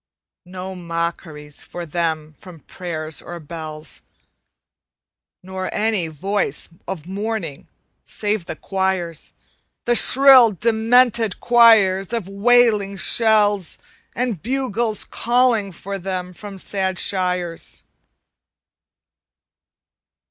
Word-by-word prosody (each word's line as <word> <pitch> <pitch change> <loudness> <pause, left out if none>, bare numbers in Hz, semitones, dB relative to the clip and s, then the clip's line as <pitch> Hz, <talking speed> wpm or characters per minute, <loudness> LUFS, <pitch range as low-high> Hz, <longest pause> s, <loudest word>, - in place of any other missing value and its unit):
No 185 +1 -7
mockeries 170 -4 -6
for 175 -1 -8
them 160 -1 -3
from 175 -2 -14
prayers 160 -4 -5
or 175 0 -9
bells, 155 -1 -9 1.4
Nor 185 0 -5
any 210 -5 -1
voice 175 0 -3 0.2
of 165 -5 -6
mourning 195 -5 -5 0.4
save 210 -3 -2
the - - -6
choirs 190 -4 -3 0.5
The 240 - +2
shrill, 255 -2 +6
demented 230 0 +2
choirs 220 -5 +4
of 225 -6 -3
wailing 205 -1 +2
shells; 210 -4 +3 0.4
And 235 -8 -2
bugles 235 -3 0
calling 240 -4 +1
for 195 +2 -7
them 180 -1 -5
from 200 +1 -10
sad 190 -1 -3
shires. 180 -3 -2
190 Hz, 90 wpm, -20 LUFS, 170-220 Hz, 1.4 s, shrill